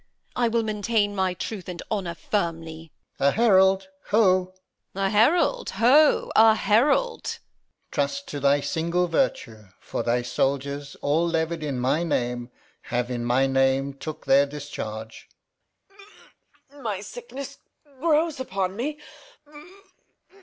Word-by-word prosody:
I 245 Hz, -1 st, +2 dB
will 230 Hz, 0 st, +1 dB
maintain 210 Hz, -1 st, 0 dB
My 190 Hz, -2 st, 0 dB
truth 190 Hz, +1 st, -6 dB
and 175 Hz, -1 st, -6 dB
honour 185 Hz, -5 st, -2 dB
firmly. 165 Hz, -5 st, -3 dB, 0.3 s
Alb. 140 Hz, -, +4 dB
A -, -, +1 dB
herald, 190 Hz, -4 st, +4 dB, 0.2 s
ho! 185 Hz, -3 st, +2 dB, 0.4 s
Edm. 195 Hz, 0 st, -1 dB
A -, -, +2 dB
herald, 340 Hz, -, +3 dB
ho, 285 Hz, +6 st, +4 dB
a 220 Hz, 0 st, +7 dB
herald! 275 Hz, -, +2 dB
Alb. -, -, -40 dB
Trust 280 Hz, 0 st, -2 dB
to 145 Hz, -, -4 dB
thy 140 Hz, +1 st, +3 dB
single 170 Hz, +5 st, 0 dB
virtue; 120 Hz, -, -1 dB
for -, -, -4 dB
thy 120 Hz, +1 st, 0 dB
soldiers, 140 Hz, +3 st, -2 dB
All 155 Hz, +4 st, +2 dB
levied 165 Hz, 0 st, -1 dB
in 140 Hz, -4 st, -3 dB
my 130 Hz, +6 st, +1 dB
name, 125 Hz, -7 st, -2 dB, 0.4 s
have 120 Hz, 0 st, -2 dB
in 120 Hz, -1 st, -3 dB
my 125 Hz, +3 st, +2 dB
name 135 Hz, +1 st, +1 dB
Took 155 Hz, +3 st, -8 dB
their 140 Hz, +1 st, +5 dB
discharge. 110 Hz, -7 st, -7 dB, 1.4 s
Reg. 285 Hz, 0 st, -15 dB
My 210 Hz, -5 st, -3 dB
sickness 280 Hz, -, -9 dB, 0.4 s
grows 315 Hz, -1 st, +1 dB
upon 190 Hz, -6 st, -2 dB
me. 295 Hz, +7 st, -3 dB
180 Hz, 130 wpm, -25 LUFS, 140-225 Hz, 1.4 s, a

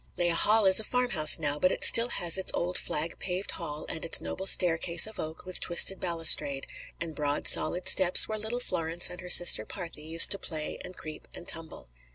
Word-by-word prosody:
Lea 175 Hz, 0 st, -2 dB
Hall 210 Hz, +5 st, -1 dB
is 190 Hz, +1 st, +7 dB
a -, -, -7 dB
farmhouse 215 Hz, -11 st, +2 dB
now, 145 Hz, -2 st, -3 dB
but 185 Hz, +4 st, -1 dB
it -, -, -4 dB
still 230 Hz, +1 st, +7 dB
has 175 Hz, -7 st, +2 dB
its 190 Hz, -, 0 dB
old 180 Hz, +1 st, -6 dB
flag 155 Hz, +3 st, -5 dB
paved 185 Hz, +1 st, -6 dB
hall 155 Hz, -3 st, -10 dB
and 160 Hz, -, -7 dB
its 165 Hz, -, +1 dB
noble 190 Hz, +1 st, -9 dB
staircase 170 Hz, -2 st, +2 dB
of 220 Hz, -, -12 dB
oak 155 Hz, +2 st, -10 dB
with 185 Hz, -1 st, -3 dB
twisted 180 Hz, +2 st, +1 dB
balustrade, 165 Hz, -5 st, -1 dB, 0.3 s
and 165 Hz, -2 st, -8 dB
broad 145 Hz, -1 st, -5 dB
solid 180 Hz, +1 st, -1 dB
steps 185 Hz, -1 st, +4 dB
where 215 Hz, 0 st, -7 dB
little 220 Hz, +3 st, -6 dB
Florence 165 Hz, -7 st, -3 dB
and 180 Hz, -, -10 dB
her 180 Hz, -, -13 dB
sister 175 Hz, 0 st, +4 dB
"Parthe" 175 Hz, -5 st, -12 dB
used 165 Hz, +2 st, +5 dB
to 200 Hz, -, -2 dB
play 155 Hz, -3 st, -7 dB
and 180 Hz, -, -12 dB
creep 155 Hz, -1 st, -13 dB
and 175 Hz, -, -14 dB
tumble. 165 Hz, -, -9 dB
175 Hz, 205 wpm, -25 LUFS, 160-190 Hz, 0.3 s, is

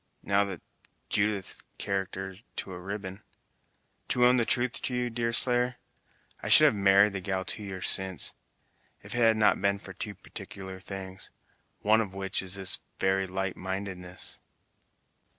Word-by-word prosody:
Now 100 Hz, 0 st, +2 dB
that's 95 Hz, -4 st, -7 dB, 0.5 s
Judith's 100 Hz, -2 st, 0 dB, 0.2 s
character 95 Hz, 0 st, -3 dB, 0.2 s
to 95 Hz, -, -5 dB
a 90 Hz, -, -7 dB
ribbon! 95 Hz, +1 st, -6 dB, 0.9 s
To 125 Hz, -1 st, +3 dB
own 125 Hz, +1 st, +5 dB
the 120 Hz, -, +2 dB
truth 120 Hz, +1 st, +1 dB
to 125 Hz, -, -2 dB
you, 125 Hz, -1 st, -1 dB
Deerslayer, 120 Hz, +1 st, +4 dB, 0.7 s
I -, -, -4 dB
should -, -, +10 dB
have -, -, +5 dB
married 100 Hz, 0 st, +5 dB
the 95 Hz, -, -3 dB
gal 95 Hz, 0 st, -2 dB
two -, -, -2 dB
years 95 Hz, -3 st, -4 dB
since, 95 Hz, -2 st, +2 dB, 0.7 s
if -, -, -8 dB
it -, -, -2 dB
had 115 Hz, -1 st, +5 dB
not 105 Hz, -3 st, +3 dB
been 100 Hz, 0 st, +2 dB
for 100 Hz, -, -10 dB
two 105 Hz, -2 st, -5 dB
particular 95 Hz, -1 st, -8 dB
things, 95 Hz, 0 st, -7 dB, 0.5 s
one 110 Hz, +2 st, +4 dB
of 95 Hz, -3 st, -5 dB
which 95 Hz, 0 st, -1 dB
was 95 Hz, 0 st, -4 dB
this 95 Hz, -3 st, +1 dB, 0.2 s
very 95 Hz, 0 st, +1 dB
lightmindedness." 95 Hz, -1 st, -3 dB
100 Hz, 150 wpm, -29 LUFS, 95-110 Hz, 0.9 s, should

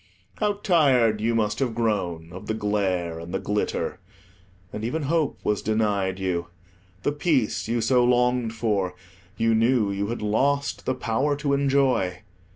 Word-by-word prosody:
How 210 Hz, -1 st, +2 dB
tired 135 Hz, -, +3 dB
you 115 Hz, +1 st, +1 dB
must 105 Hz, -2 st, 0 dB
have 125 Hz, -5 st, -1 dB
grown 90 Hz, -8 st, -1 dB
of 95 Hz, -, -9 dB
the 110 Hz, -, -1 dB
glare 95 Hz, -6 st, -1 dB
and 85 Hz, +1 st, -8 dB
the -, -, 0 dB
glitter! 105 Hz, 0 st, -2 dB, 0.7 s
And 105 Hz, -, -5 dB
even 150 Hz, +7 st, -2 dB
hope 155 Hz, +1 st, 0 dB
was 105 Hz, -1 st, 0 dB
denied 100 Hz, -3 st, 0 dB
you. 90 Hz, -3 st, -2 dB, 0.6 s
The -, -, +1 dB
peace 145 Hz, -9 st, 0 dB
you 115 Hz, +1 st, 0 dB
so 125 Hz, +2 st, +3 dB
longed 125 Hz, -1 st, +2 dB
for 100 Hz, -5 st, -1 dB, 0.4 s
you 115 Hz, 0 st, +2 dB
knew 115 Hz, -2 st, +3 dB
you 100 Hz, +1 st, -2 dB
had 115 Hz, 0 st, -4 dB
lost 140 Hz, +7 st, 0 dB
the 130 Hz, -, +1 dB
power 130 Hz, +4 st, 0 dB
to 140 Hz, 0 st, -1 dB
enjoy. 135 Hz, -10 st, +1 dB
115 Hz, 160 wpm, -25 LUFS, 100-130 Hz, 0.7 s, tired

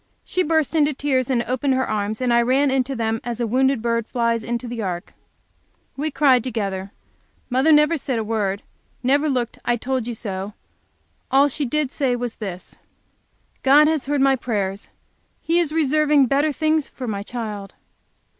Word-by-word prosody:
She 370 Hz, -, 0 dB
burst 320 Hz, -2 st, +1 dB
into 300 Hz, -2 st, +2 dB
tears 265 Hz, -3 st, 0 dB
and 240 Hz, -3 st, +1 dB
opened 260 Hz, +3 st, 0 dB
her 260 Hz, 0 st, 0 dB
arms, 215 Hz, +2 st, -2 dB
and 245 Hz, -1 st, +2 dB
I 235 Hz, -, +5 dB
ran 265 Hz, +3 st, +2 dB
into 265 Hz, 0 st, 0 dB
them 225 Hz, -1 st, -1 dB
as 240 Hz, 0 st, -4 dB
a 240 Hz, -, 0 dB
wounded 260 Hz, +1 st, +1 dB
bird 230 Hz, -1 st, 0 dB
flies 230 Hz, -2 st, 0 dB
into 240 Hz, +2 st, -3 dB
the 235 Hz, -1 st, -4 dB
ark. 180 Hz, -2 st, -4 dB, 0.8 s
We 300 Hz, +3 st, -2 dB
cried 270 Hz, -5 st, +3 dB
together. 200 Hz, -5 st, -3 dB, 0.6 s
Mother 265 Hz, +6 st, +3 dB
never 300 Hz, +2 st, +5 dB
said, 260 Hz, -3 st, -3 dB, 0.9 s
never 285 Hz, +4 st, +2 dB
looked, 245 Hz, -4 st, -2 dB
"I 240 Hz, -, +1 dB
told 250 Hz, 0 st, -2 dB
you 240 Hz, -, -4 dB
so." 200 Hz, -1 st, -5 dB, 0.7 s
All 275 Hz, +2 st, +4 dB
she 285 Hz, +1 st, -2 dB
did 295 Hz, +1 st, -1 dB
say 265 Hz, -4 st, 0 dB
was 245 Hz, -1 st, -4 dB
this, 190 Hz, -4 st, -7 dB, 0.8 s
"God 290 Hz, +3 st, +6 dB
has 310 Hz, -4 st, 0 dB
heard 290 Hz, -1 st, +1 dB
my 270 Hz, 0 st, +4 dB
prayers! 205 Hz, -5 st, -3 dB, 0.5 s
He 335 Hz, +1 st, +1 dB
is 335 Hz, -4 st, 0 dB
reserving 300 Hz, -2 st, +3 dB
better 285 Hz, +4 st, +2 dB
things 310 Hz, +1 st, 0 dB
for 255 Hz, -, -7 dB
my 200 Hz, -3 st, -3 dB
child!" 210 Hz, -3 st, -6 dB
255 Hz, 170 wpm, -22 LUFS, 230-285 Hz, 0.9 s, God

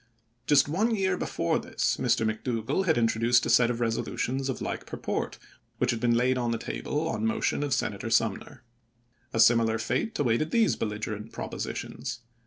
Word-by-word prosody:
Just 145 Hz, -1 st, +5 dB
one 215 Hz, +10 st, +1 dB
year 190 Hz, -2 st, +1 dB
before 85 Hz, -, -1 dB
this, -, -, -1 dB
Mr. 110 Hz, -, +1 dB
Mc 110 Hz, 0 st, 0 dB
%?u9n' 115 Hz, -4 st, -2 dB
Dougall 190 Hz, -, +1 dB
had 160 Hz, -, +3 dB
introduced 115 Hz, +1 st, +3 dB
a -, -, +1 dB
set 120 Hz, -1 st, +5 dB
of 120 Hz, -1 st, -2 dB
resolutions 125 Hz, +3 st, -1 dB
of 130 Hz, -, -3 dB
like -, -, -4 dB
purport, -, -, -3 dB, 0.4 s
which -, -, +1 dB
had 115 Hz, -, -2 dB
been 120 Hz, 0 st, +2 dB
laid 125 Hz, +1 st, +2 dB
on 120 Hz, -1 st, -1 dB
the 115 Hz, -, 0 dB
table 150 Hz, +6 st, -3 dB
on 165 Hz, -, -2 dB
motion 225 Hz, -8 st, 0 dB
of 145 Hz, -1 st, -2 dB
Senator 115 Hz, -5 st, -1 dB
Sumner. 115 Hz, 0 st, 0 dB, 0.7 s
A 115 Hz, -, -2 dB
similar 115 Hz, -1 st, +5 dB
fate 215 Hz, -, -2 dB
awaited 140 Hz, +3 st, +1 dB
these 225 Hz, +3 st, +3 dB
belligerent 105 Hz, 0 st, -4 dB
propositions. 120 Hz, -2 st, -5 dB
120 Hz, 180 wpm, -28 LUFS, 115-145 Hz, 0.7 s, Just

